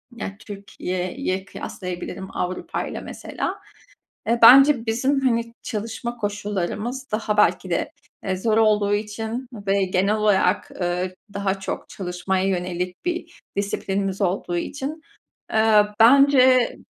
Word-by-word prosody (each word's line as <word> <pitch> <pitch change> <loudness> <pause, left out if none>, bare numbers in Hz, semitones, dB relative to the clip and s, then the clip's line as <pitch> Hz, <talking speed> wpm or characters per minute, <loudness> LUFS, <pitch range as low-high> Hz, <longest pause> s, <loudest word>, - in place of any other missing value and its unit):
ya 200 -3 -6
Türkiye'ye 185 -2 -4
kıyaslayabilirim 190 -1 -6
Avrupa'yla 180 0 -3
mesela. - - -5 0.7
E, 235 +1 +2
bence 265 +1 +8
bizim 260 +5 +1
hani 230 -3 0
çalışma 230 +2 -4
koşullarımız 210 +4 -3
daha 215 -1 -1
belki - - +3
de, - - -1 0.3
eee, 185 -1 -1
zor 215 +3 +1
olduğu 210 -2 +3
için 220 +4 -4
ve 200 -2 0
genel 190 +3 +1
olarak, 205 -3 +2
ııı, 180 +1 -2 0.2
daha 200 -1 -1
çok 195 - -5
çalışmaya 185 0 -2
yönelik 180 - -3
bir 345 -1 -4 0.2
disiplinimiz 195 -1 -2
olduğu 180 -2 -1
için, 285 - -4 0.5
eee, 220 -1 +5
bence 260 0 +6
205 Hz, 115 wpm, -23 LUFS, 190-235 Hz, 0.7 s, bence